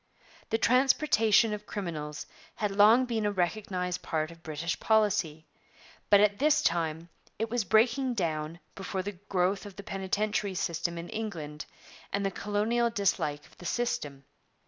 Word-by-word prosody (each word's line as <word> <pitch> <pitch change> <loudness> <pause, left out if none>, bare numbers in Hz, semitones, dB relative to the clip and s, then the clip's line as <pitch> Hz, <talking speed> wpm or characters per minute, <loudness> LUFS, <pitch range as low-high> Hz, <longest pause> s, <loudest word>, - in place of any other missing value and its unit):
The 225 - +2
transportation 235 -3 +4
of 210 0 -6
criminals 155 -6 -5 0.3
had 210 -2 -1
long 215 +6 +6
been 230 -3 -1
a 205 - +1
recognized 180 -1 -2
part 155 0 -2
of 165 0 -15
British 160 +1 -3
policy, 205 -8 +1 0.6
but 205 - +7
at 205 0 +3
this 300 +2 +3
time 165 0 0 0.3
it 225 +1 -2
was 240 -2 +1
breaking 240 +6 +2
down 160 -3 -2
before 190 0 -4
the 205 - -3 0.2
growth 190 +1 +1
of 205 -3 -10
the 200 - -9
penitentiary 200 0 -1
system 170 0 -2
in 170 +1 -6
England 165 -9 -5 0.4
and 200 0 -1
the 195 - 0
colonial 215 +5 0
dislike 180 -9 -1
of - - -22
the 180 - -10
system. 145 - -2
200 Hz, 150 wpm, -29 LUFS, 170-220 Hz, 0.6 s, but